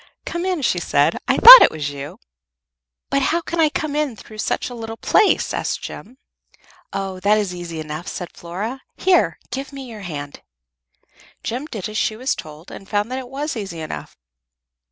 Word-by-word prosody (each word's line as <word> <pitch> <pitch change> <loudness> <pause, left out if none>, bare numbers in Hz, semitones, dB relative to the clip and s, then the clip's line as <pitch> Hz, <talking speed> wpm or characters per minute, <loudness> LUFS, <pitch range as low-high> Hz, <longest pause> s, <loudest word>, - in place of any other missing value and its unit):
"Come 345 +1 -3
in," 360 -6 -1
she - - +1
said. - - +1
"I - - +2
thought - - +13
it - - +7
was 150 -2 -4
you." 140 0 -8 0.9
"But 275 - +2
how 330 +5 +1
can 340 0 -5
I 315 -2 +5
come 295 -1 -3
in 300 -5 -1
through 215 +1 -13
such - - -1
a 245 - -8
little 225 -1 -7
place?" 420 - +2
asked - - -3
Jem. 245 +6 -9 0.7
"Oh, 195 -1 -4
that 205 +3 +3
is 205 -4 -1
easy 175 -2 -6
enough," 155 +2 -6
said 180 - -6
Flora. 205 +10 -6 0.2
"Here, 370 -1 +2
give 275 +1 -5
me 275 -1 -8
your 220 -3 -9
hand." 145 -6 -7 1.0
Jem 255 +6 -4
did 215 - -5
as 215 0 -3
she 215 - -1 0.2
told 155 +2 -11
her, - - -8
and 195 - -13
found 210 +3 -1
that 260 - -2
it 250 -2 -9
was 285 +3 -4
easy 195 -7 -6
enough. 155 -1 -7
215 Hz, 190 wpm, -21 LUFS, 175-275 Hz, 1.0 s, thought